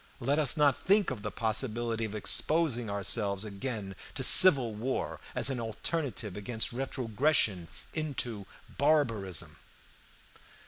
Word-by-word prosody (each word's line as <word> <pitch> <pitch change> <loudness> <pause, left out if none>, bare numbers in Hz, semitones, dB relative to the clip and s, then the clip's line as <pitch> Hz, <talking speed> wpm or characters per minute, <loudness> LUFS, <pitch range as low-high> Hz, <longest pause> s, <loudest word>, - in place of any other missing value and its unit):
Let 140 +4 -1
us 150 0 +5
not 145 -2 +3
think 200 -3 +2
of 120 -5 -6
the 105 - -5
possibility 115 0 -2
of 110 -1 -7
exposing 125 +1 -1
ourselves 100 0 0
again 105 -1 -6 0.2
to - - -2
civil 135 -11 +8
war 120 +5 -4 0.2
as - - +1
an 130 - -4
alternative 115 - -5
against 110 +3 -2
retrogression 125 - -1 0.3
into 125 - -4 0.3
barbarism. 115 - 0
120 Hz, 120 wpm, -29 LUFS, 105-140 Hz, 0.3 s, civil